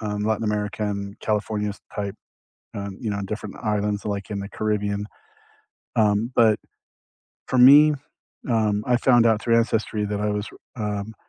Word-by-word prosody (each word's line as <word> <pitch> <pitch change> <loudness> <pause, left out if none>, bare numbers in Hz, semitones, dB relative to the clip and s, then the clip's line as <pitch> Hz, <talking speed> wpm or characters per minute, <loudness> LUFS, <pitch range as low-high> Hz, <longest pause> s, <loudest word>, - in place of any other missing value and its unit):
um, 105 -1 -3
Latin 110 0 0
America 105 0 -2
and 100 0 -3
California 105 0 -1
s 100 - -9 0.2
type, 100 0 -4 0.6
um, 100 -1 -6
you 110 - -2
know, 100 -1 -2
different 105 0 -6
islands 105 -2 -1
like 100 0 -4
in 100 -1 -3
the 100 - -6
Caribbean. 105 -1 -1 0.9
Um, 105 +2 +2
but 110 -2 +5 0.9
for 130 - 0
me, 145 +4 +8 0.6
um, 105 -3 +1
I 125 - +4
found 120 -1 +4
out 110 -2 +3
through 115 0 +2
ancestry 110 -2 0
that 105 0 -3
I 105 0 0
was 105 +1 -3
re - - -16 0.2
um, 105 -1 -3
105 Hz, 165 wpm, -23 LUFS, 105-110 Hz, 0.9 s, me